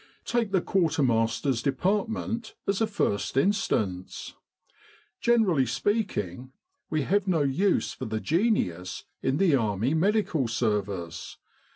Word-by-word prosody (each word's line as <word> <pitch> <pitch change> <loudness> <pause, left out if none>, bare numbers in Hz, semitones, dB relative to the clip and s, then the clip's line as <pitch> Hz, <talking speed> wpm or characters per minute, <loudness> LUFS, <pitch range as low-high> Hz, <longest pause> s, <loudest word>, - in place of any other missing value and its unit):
Take 235 -4 0
the 190 -2 +3
quartermaster's 135 -8 +1
de 140 - +1
partment, 220 - -1
as 200 +2 0
a 225 - +3
first 130 - -1
instance. 105 - 0 0.9
Generally 195 - +3
speaking, 130 - -2 0.4
we 155 -2 0
have 200 +7 +1
no 165 -5 +2
use 175 +9 +1
for - - -6
the 110 0 -2
genius 135 - 0 0.2
in 135 +1 +1
the 180 -4 +3
Army 110 +2 0
Medical 170 - +1
Service. 100 -8 -2
145 Hz, 115 wpm, -27 LUFS, -, 0.9 s, the